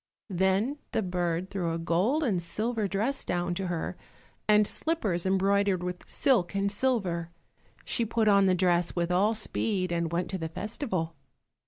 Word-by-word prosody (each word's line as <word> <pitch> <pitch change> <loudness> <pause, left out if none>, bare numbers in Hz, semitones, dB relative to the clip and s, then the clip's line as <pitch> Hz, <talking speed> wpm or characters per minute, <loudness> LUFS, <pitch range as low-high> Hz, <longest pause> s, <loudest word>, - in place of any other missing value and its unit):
Then 190 +10 +1
the 220 - +1
bird 180 0 -1
threw 175 -4 -1
a - - -1
gold 180 - +1
and 200 -10 +1
silver 215 +5 -2
dress 215 +8 -1
down 175 0 -1
to 190 +1 -2
her, 175 +1 -3 0.5
and 210 0 +5
slippers 205 - -1
embroidered 195 -1 +2
with 180 0 -5
silk 205 -9 +2
and 200 0 +1
silver. 200 -8 0 0.6
She 235 - 0
put 225 0 +1
on 200 -1 +6
the 185 -1 +4
dress 175 -1 +2
with 175 0 0
all 205 +5 +3
speed, 200 -3 0
and 170 -1 -1
went 175 +2 -1
to 190 - -3
the 160 -1 -3
festival. 190 - -3
190 Hz, 165 wpm, -28 LUFS, 175-215 Hz, 0.6 s, on